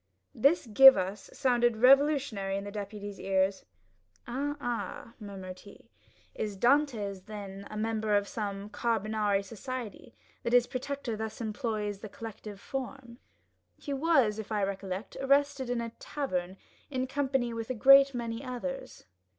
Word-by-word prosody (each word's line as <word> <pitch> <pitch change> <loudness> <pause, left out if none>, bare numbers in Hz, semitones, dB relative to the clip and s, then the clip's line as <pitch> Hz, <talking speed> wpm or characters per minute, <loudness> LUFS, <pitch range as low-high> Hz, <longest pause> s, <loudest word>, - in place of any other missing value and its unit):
This 280 +7 +3
give 265 +4 +9
us 190 +3 -3
sounded 240 -4 +2
revolutionary 260 -6 +4
in 200 - -4
the 205 - -7
deputy's 205 -1 -6
ears. 190 0 0 0.6
"Ah, 285 +4 -3
ah," 240 -2 -4
murmured 190 -3 -8
he, 200 - -16 0.4
"is 210 -2 -4
Dantès 230 -7 +1
then 200 -2 -8
a 215 - -7
member 220 -1 0
of 200 0 -1
some 200 -1 -5
Carbonari 215 -3 0
society, 235 +1 -7 0.3
that 235 - -2
his 245 -1 +6
protector 260 -2 -4
thus 220 0 -5
employs 215 -3 -3
the 215 - -8
collective 210 -2 -9
form? 260 -1 -6 0.6
He 285 - -5
was, 270 -8 +2
if 220 0 -7
I 210 -2 0
recollect, 195 0 -4
arrested 275 -1 +2
in 245 -1 0
a 230 -1 -5
tavern, 185 -10 -3 0.3
in 260 -2 -1
company 265 -3 -1
with 230 +1 -5
a 255 - -1
great 275 +3 +7
many 230 0 -4
others." 265 +1 -6
225 Hz, 140 wpm, -30 LUFS, 205-265 Hz, 0.6 s, give